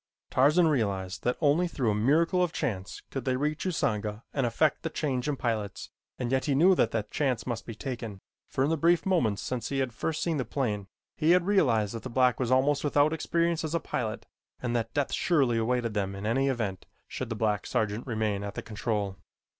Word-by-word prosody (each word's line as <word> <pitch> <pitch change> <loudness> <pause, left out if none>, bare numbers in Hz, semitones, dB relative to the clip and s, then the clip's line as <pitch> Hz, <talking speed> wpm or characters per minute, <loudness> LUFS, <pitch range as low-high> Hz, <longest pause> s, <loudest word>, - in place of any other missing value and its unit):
Tarzan 150 +7 +5
realized 100 -8 -1
that 125 - +1
only 155 +4 +3
through 130 -9 0
a - - +1
miracle 155 - +3
of 175 -2 +1
chance 100 - -3
could 135 - -3
they 130 -1 0
reach 150 +5 -1
Usanga 110 - -1
and 135 -4 +1
effect 150 +7 +1
the 165 - -2
change 135 -4 -1
in 145 - 0
pilots 110 -6 -3 0.3
and 125 -1 -3
yet 130 0 +1
he 140 - +1
knew 180 +7 +6
that - - +3
that 105 -2 -3
chance 130 -6 0
must 120 -2 -4
be 115 - -6
taken, 115 -5 -5 0.3
for 130 - 0
in 145 - +1
the 165 - +1
brief 170 +3 +3
moments 125 - +1
since 125 -2 -3
he 140 - -2
had 130 -3 -1
first 155 +7 -2
seen 165 -3 0
the 130 - 0
plane, 105 -8 -2 0.3
he 165 +2 +4
had 180 -1 +3
realized 120 - +2
that 115 - -5
the 130 - -6
black 125 0 +3
was 125 -3 0
almost 135 +3 +3
without 145 +1 +3
experience 170 +1 0
as 160 +1 -2
a - - +2
pilot 110 -8 -3 0.3
and 120 -1 -2
that 115 -2 -1
death 145 -2 0
surely 135 -9 +2
awaited 120 0 0
them 100 -2 -1
in 100 +1 -6
any 135 +5 +2
event 110 -8 -2 0.2
should 130 - -5
the 115 - -2
black 105 -3 0
sergeant 110 +3 -1
remain 110 -4 -1
at 100 0 -5
the - - -5
control. 105 -3 -2
125 Hz, 215 wpm, -28 LUFS, 110-150 Hz, 0.3 s, knew